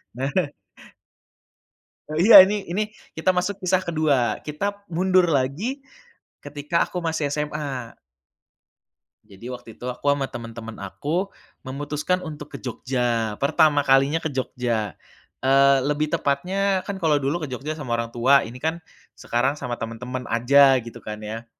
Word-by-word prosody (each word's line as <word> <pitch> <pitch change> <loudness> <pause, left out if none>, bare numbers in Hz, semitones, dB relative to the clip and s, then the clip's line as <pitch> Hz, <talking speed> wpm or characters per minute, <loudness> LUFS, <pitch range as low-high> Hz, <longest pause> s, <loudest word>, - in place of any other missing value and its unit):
nah. 135 +2 -2 1.8
Oh 155 - -6
iya, 200 +6 +9
ini 205 0 -2
ini 205 +4 0 0.4
kita 185 +3 +2
masuk 185 +2 -1
kisah 185 -1 +1
kedua, 150 -9 +1
kita 200 +7 -4
mundur 185 0 +3
lagi, 165 - -1 0.6
ketika 145 +3 -1
aku 180 -1 -5
masih 160 -3 -1
SMA. 145 -4 -4 1.3
Jadi 100 +5 -11
waktu 125 -2 -8
itu 125 - -7
aku 140 +3 0
sama 140 -2 -1
teman-teman 115 -1 -8
aku 165 - -3 0.3
memutuskan 145 +6 -2
untuk 150 -3 -8
ke - - -6
Jogja, 120 -3 -2
pertama 150 0 +4
kalinya 135 +4 +4
ke - - -2
Jogja. 120 - -2 0.5
Eee, 135 +1 +5
lebih 150 +1 0
tepatnya, 190 +7 0
kan 200 -1 -4
kalo 160 -4 +2
dulu 150 +4 -1
ke - - -3
Jogja 135 +4 -4
sama 130 -6 -3
orang 115 0 -3
tua, 130 +4 +4
ini 120 +3 -9
kan 160 +2 -2 0.4
sekarang 130 +4 0
sama 120 -4 -4
teman-teman 125 +3 -5
aja, 135 +3 +5
gitu 115 0 -10
kan 105 0 -6
ya. 110 +2 -6
140 Hz, 140 wpm, -23 LUFS, 125-165 Hz, 1.8 s, iya